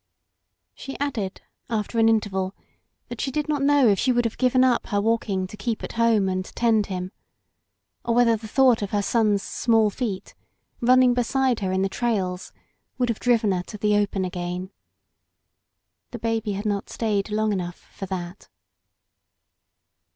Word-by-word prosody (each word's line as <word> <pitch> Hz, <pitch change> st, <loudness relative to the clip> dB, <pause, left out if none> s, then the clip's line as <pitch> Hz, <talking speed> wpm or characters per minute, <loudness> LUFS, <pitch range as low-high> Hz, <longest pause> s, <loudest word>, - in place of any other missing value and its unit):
She 270 Hz, -, -8 dB
added 225 Hz, -9 st, -3 dB, 0.3 s
after 225 Hz, 0 st, -1 dB
an 225 Hz, 0 st, +5 dB
interval, 195 Hz, -4 st, 0 dB, 0.5 s
that 240 Hz, -1 st, -5 dB
she 275 Hz, -, -1 dB
did 300 Hz, +3 st, -2 dB
not 295 Hz, -2 st, 0 dB
know 280 Hz, -2 st, +4 dB
if 200 Hz, -2 st, +3 dB
she 255 Hz, -, +2 dB
would 240 Hz, -1 st, +1 dB
have 230 Hz, -, -3 dB
given 255 Hz, 0 st, +4 dB
up 255 Hz, -2 st, +2 dB
her 205 Hz, -, 0 dB
walking 205 Hz, -3 st, 0 dB
to 185 Hz, -, -9 dB
keep 215 Hz, +2 st, -3 dB
at -, -, -5 dB
home 230 Hz, -4 st, +2 dB
and 185 Hz, 0 st, -1 dB
tend 220 Hz, 0 st, +1 dB
him, 185 Hz, -1 st, -4 dB, 0.9 s
or 235 Hz, -, 0 dB
whether 235 Hz, -1 st, +4 dB
the 220 Hz, 0 st, -8 dB
thought 255 Hz, 0 st, +4 dB
of 200 Hz, -, -2 dB
her 205 Hz, 0 st, 0 dB
son's 210 Hz, -2 st, +2 dB
small 225 Hz, -3 st, +2 dB
feet 200 Hz, -5 st, -4 dB, 0.5 s
running 255 Hz, 0 st, +5 dB
beside 250 Hz, 0 st, +1 dB
her 190 Hz, -3 st, -2 dB
in 190 Hz, +1 st, +1 dB
the -, -, +2 dB
trails 190 Hz, -4 st, -2 dB, 0.5 s
would 250 Hz, -2 st, 0 dB
have 230 Hz, -, -1 dB
driven 230 Hz, -4 st, +2 dB
her 180 Hz, -1 st, 0 dB
to 210 Hz, -, -8 dB
the 210 Hz, 0 st, +2 dB
open 200 Hz, -2 st, 0 dB
again. 180 Hz, +1 st, -4 dB, 1.4 s
The 240 Hz, -, -7 dB
baby 225 Hz, -2 st, -1 dB
had 200 Hz, +2 st, -5 dB
not 205 Hz, -2 st, -2 dB
stayed 210 Hz, -3 st, -1 dB
long 215 Hz, 0 st, 0 dB
enough 175 Hz, -2 st, -4 dB, 0.2 s
for 195 Hz, -, -6 dB
that. 180 Hz, 0 st, -6 dB
215 Hz, 170 wpm, -24 LUFS, 195-240 Hz, 1.4 s, an